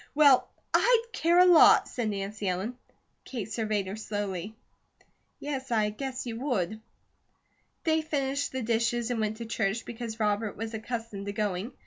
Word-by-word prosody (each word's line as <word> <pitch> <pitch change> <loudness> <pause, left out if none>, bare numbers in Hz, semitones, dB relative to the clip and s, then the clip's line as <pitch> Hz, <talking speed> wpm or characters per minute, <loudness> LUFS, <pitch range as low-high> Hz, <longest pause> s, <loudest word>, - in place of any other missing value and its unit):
"Well, 285 -4 +6 0.2
I'D 470 -1 +4
care 340 +1 +2
a 360 - +8
lot!" 350 -3 +7
said 235 -3 -2
Nancy 200 0 -4
Ellen. 190 +7 -2 0.5
Kate 225 -5 -6
surveyed 215 -3 -1
her 190 +2 -5
slowly. 205 -2 -4 0.8
"Yes, 270 -2 -4
I 215 -3 +1
guess 260 +4 -5
you 230 -1 -5
would." 220 -6 -1 1.0
They 320 -1 +2
finished 285 -2 -1
the 260 -1 -3
dishes 235 +1 0
and 235 - -1
went 215 0 -1
to 230 - -6
church, 220 -1 -1
because 230 -1 -6
Robert 210 0 0
was 225 +2 -5
accustomed 220 -2 -5
to 200 - -3
going. 205 +2 -2
225 Hz, 155 wpm, -28 LUFS, 210-260 Hz, 1.0 s, a